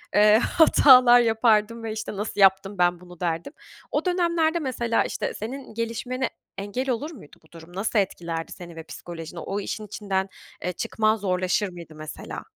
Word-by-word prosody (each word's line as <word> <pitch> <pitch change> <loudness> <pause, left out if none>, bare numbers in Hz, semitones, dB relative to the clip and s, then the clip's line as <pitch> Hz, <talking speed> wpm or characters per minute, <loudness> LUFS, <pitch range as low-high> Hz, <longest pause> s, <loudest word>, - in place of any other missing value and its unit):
eee, 210 +1 +7
hatalar 255 -4 +6
yapardım 225 -1 +2
ve 225 - -3
işte 215 -1 -5
"nasıl 205 0 -4
yaptım 195 +1 +4
ben 175 -1 +2
bunu" 180 -1 -14
derdim. 170 - -2 0.4
O - - -1
dönemlerde 340 -2 +1
mesela 240 -5 0
işte - - -3
senin 255 +3 -7
gelişmene 230 +3 -2 0.3
engel 205 +7 -3
olur 270 +6 -2
muydu 205 - -14
bu 155 - -25
durum? 165 +1 -13
Nasıl 210 +2 +1
etkilerdi 170 -4 -3
seni 170 -2 -10
ve 165 - -8
psikolojini? 165 +1 -8
O 195 +4 -3
işin 210 +1 -5
içinden, 195 -2 -2 0.3
eee, 180 - -1
çıkman 215 +5 +1
zorlaşır 185 0 0
mıydı 170 -3 -11
mesela? 155 0 -7
210 Hz, 160 wpm, -25 LUFS, 180-240 Hz, 0.4 s, eee